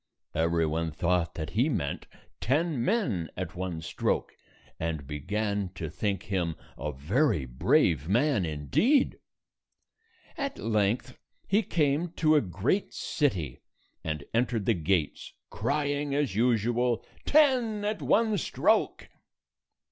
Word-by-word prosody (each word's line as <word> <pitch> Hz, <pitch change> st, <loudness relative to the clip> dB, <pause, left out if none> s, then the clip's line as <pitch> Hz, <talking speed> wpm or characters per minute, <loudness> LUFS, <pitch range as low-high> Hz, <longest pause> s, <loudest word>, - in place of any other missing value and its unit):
Every 85 Hz, +1 st, +2 dB
one 80 Hz, +1 st, -1 dB
thought 85 Hz, +1 st, 0 dB
that 80 Hz, 0 st, -4 dB
he 120 Hz, -, +2 dB
meant 85 Hz, -, -2 dB, 0.3 s
ten 145 Hz, 0 st, +1 dB
men 120 Hz, -, 0 dB
at 90 Hz, -3 st, -4 dB
128 -, -, -22 dB
one 90 Hz, -3 st, -4 dB
stroke, -, -, -1 dB, 0.4 s
and 80 Hz, -3 st, -3 dB
began 100 Hz, +7 st, -2 dB
to 80 Hz, -5 st, -5 dB
think 100 Hz, +1 st, -2 dB
him 90 Hz, -5 st, -1 dB, 0.2 s
a 75 Hz, -, -4 dB
very 95 Hz, -, +1 dB
brave 80 Hz, -, +2 dB
man, 120 Hz, 0 st, +2 dB
indeed. 80 Hz, -, +2 dB, 1.2 s
At 280 Hz, -3 st, -3 dB
length, 110 Hz, 0 st, 0 dB, 0.3 s
he 205 Hz, +3 st, +3 dB
came 160 Hz, -2 st, 0 dB
to 155 Hz, -2 st, +3 dB
a 150 Hz, -, +5 dB
great 100 Hz, -, -1 dB
city, 95 Hz, -, -1 dB, 0.4 s
and 75 Hz, -3 st, -3 dB
entered 115 Hz, -3 st, +1 dB
the 115 Hz, -, +4 dB
gates, 85 Hz, -3 st, -1 dB, 0.2 s
crying 145 Hz, +4 st, -1 dB
as 145 Hz, -7 st, 0 dB
usual, 120 Hz, +1 st, +1 dB, 0.2 s
"Ten 250 Hz, -8 st, +3 dB
at 210 Hz, 0 st, -2 dB
one 220 Hz, -2 st, +2 dB
stroke!" -, -, +1 dB
105 Hz, 125 wpm, -28 LUFS, -, 1.2 s, a